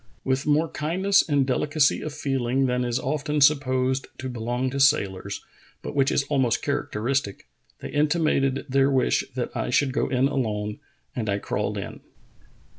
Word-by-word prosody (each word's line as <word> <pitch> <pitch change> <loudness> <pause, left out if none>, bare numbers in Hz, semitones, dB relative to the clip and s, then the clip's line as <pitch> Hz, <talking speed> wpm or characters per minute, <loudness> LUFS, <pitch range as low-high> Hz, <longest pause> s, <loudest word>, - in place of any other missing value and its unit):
With 130 +1 -1
more 150 +2 +3
kindness 185 +7 +2
and 140 -2 +3
delicacy 145 +3 +1
of 155 - -4
feeling 135 -3 0
than 125 -1 0
is 120 0 -1
often 150 +2 -1
supposed 130 -2 +2
to 130 - -5
belong 120 +2 -2
to 140 - -3
sailors, 100 -8 +1 0.4
but - - -5
which 135 -1 +2
is - - +2
almost 135 -5 0
characteristic, 115 -1 -2 0.4
they - - -6
intim 155 +2 +1
ated 135 -2 +1
their 135 0 +3
wish 130 -2 +2
that 125 -2 -3
I - - -2
should 135 +1 +2
go - - 0
in 130 +1 +2
alone, 105 -6 -2 0.4
and 110 -3 -2
I 100 - +1
crawled - - -2
in. - - -6
135 Hz, 165 wpm, -25 LUFS, 125-145 Hz, 0.4 s, more